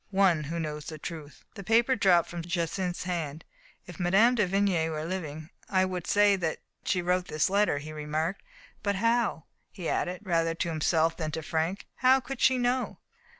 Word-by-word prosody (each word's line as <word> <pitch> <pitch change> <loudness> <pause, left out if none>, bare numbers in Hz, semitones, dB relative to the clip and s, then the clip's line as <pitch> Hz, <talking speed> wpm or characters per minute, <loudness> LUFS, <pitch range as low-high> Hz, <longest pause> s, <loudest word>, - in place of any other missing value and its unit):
"One 190 -6 +3
Who 170 +3 -3
Knows 150 -2 -4
the 155 - -6
Truth." 155 -1 -8
The 200 - -8
paper 230 +5 +3
dropped 180 -6 +4
from 175 -1 -5
Jacynth's 175 +1 -2
hands. 165 -4 -3 0.4
"If 180 0 -11
Mme. 195 +7 +4
de 210 -6 +2
Vigny 185 -4 +1
were 155 -1 -3
living 160 -3 -5 0.2
I 185 -1 +3
should 180 -2 -4
say 205 -1 +5
that 165 -4 -2 0.3
she 180 -3 0
wrote 180 +1 +1
this 155 +4 0
letter," 200 -6 +3
he 155 +2 -7
remarked. 155 +4 -2 0.4
"But 200 -1 0
how," 230 -5 +1 0.3
he 180 -5 -6
added, 180 +2 -1
rather 165 -3 +1
to 170 - -2
himself 160 +1 +1
than 155 -3 -2
to 160 - -3
Frank, 165 +6 -2
"how 260 +1 +5
could 260 0 -7
she 260 - +5
know?" 250 +1 0
175 Hz, 185 wpm, -28 LUFS, 160-200 Hz, 0.4 s, say